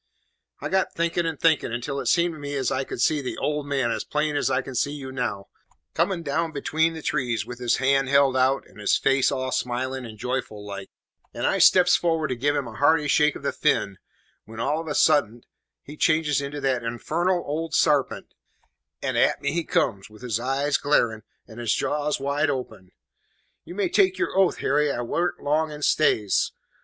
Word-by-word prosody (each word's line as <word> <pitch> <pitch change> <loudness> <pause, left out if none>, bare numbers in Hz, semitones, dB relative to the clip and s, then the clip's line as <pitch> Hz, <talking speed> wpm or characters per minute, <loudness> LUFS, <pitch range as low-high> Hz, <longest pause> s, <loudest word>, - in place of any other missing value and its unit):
"I - - -3
got 190 0 +1
thinking 170 0 0
and 160 -3 -4
thinking, 160 -7 +2
until 125 +4 -3
it - - -4
seemed 170 -1 +2
to 155 - -10
me 145 0 -5
as 135 -3 -1
I 130 - 0
could - - -7
see 150 -2 +2
the 130 - -5
`old 150 -1 -2
man' 135 -4 0
as - - -2
plain 150 0 -1
as 145 - +1
I 130 - 0
can 135 - -8
see 140 +4 0
you 135 -3 -7
now, 105 -7 -3 0.5
coming 170 +1 0
down 160 +3 -1
between 160 +3 0
the 160 - -8
trees, 120 -7 -1
with 125 +1 -8
his 120 -1 +1
hand 135 0 +2
held 140 -1 +4
out, 130 +1 +2
and - - -18
his 105 - +2
face 135 -1 +2
all 130 -1 -2
smiling 130 +2 -2
and 110 -1 -11
joyful 115 -3 -4
like, 100 -1 -7 0.5
and - - -2
I - - +1
steps 180 -1 +6
forward 165 -3 0
to 130 - -1
give 145 +4 0
him 140 -4 -2
a 115 - -9
hearty 145 +5 +3
shake 150 +1 +3
of - - -9
the 140 - 0
fin, 100 -10 0 0.5
when 110 +1 -10
all 150 +6 0
of 165 - -10
a 150 - -3
suddent 120 -7 +2 0.4
he 150 - -10
changes 155 -2 +2
into 140 +1 -5
that 130 -3 0
infarnal 170 +10 -1
old 155 +2 -3
sarpent, 145 -4 +1 0.7
and - - -1
at - - +3
me 145 - -1
he 170 +2 -1
comes, 110 - -1
with 105 +3 -16
his 115 -3 -1
eyes 135 +3 0
glaring, 120 -7 +1 0.3
and 110 0 -11
his 115 -2 0
jaws 150 0 -1
wide 140 +2 0
open. 125 -9 -5 0.7
"You 175 - -9
may 200 -2 0
take 190 0 +2
your - - -2
oath, 190 -2 +3
Harry, 145 +1 +1
I 120 - -3
warn't 170 +8 -2
long 155 +2 +1
in 150 0 -8
stays. 110 -11 +2
140 Hz, 210 wpm, -24 LUFS, 125-155 Hz, 0.7 s, steps